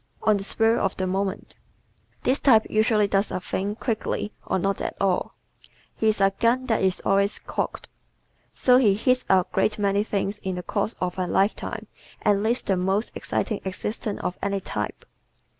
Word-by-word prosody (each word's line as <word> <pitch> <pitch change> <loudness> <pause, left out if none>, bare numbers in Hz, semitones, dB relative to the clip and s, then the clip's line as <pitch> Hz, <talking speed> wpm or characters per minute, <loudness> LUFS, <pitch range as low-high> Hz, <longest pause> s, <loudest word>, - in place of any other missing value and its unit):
On 215 - +4
the 200 - -2
Spur 225 +3 +2
of 195 - -1
the 185 - -1
Moment 190 +1 -2 0.7
¶ - - -35
This 265 +3 +2
type 225 -6 +5
usually 215 -1 +3
does 200 +1 +1
a - - -2
thing 195 +3 -3
quickly 220 -2 -2
or - - 0
not 195 +2 -1
at - - -3
all. 190 -2 0 0.6
He 220 - 0
is 215 -1 +2
a 195 0 +4
gun 245 +2 +2
that 225 -4 +1
is 190 -1 0
always 200 +1 +2
cocked. - - -4 0.7
So 250 -1 +5
he 215 -7 +4
hits 255 +4 +1
a 185 -1 +5
great 215 - +1
many 200 0 +1
things 205 -1 -2
in 190 -3 -3
the 180 - -5
course 210 +4 -2
of 180 0 -2
a 180 - 0
lifetime 195 +4 0 0.4
and 200 -1 +3
leads 230 +4 0
the 190 - +1
most 190 +4 0
exciting 215 - -2
existence 205 +2 -4
of 180 - -3
any 200 0 0
type. 105 - -5
200 Hz, 185 wpm, -25 LUFS, 190-220 Hz, 0.7 s, type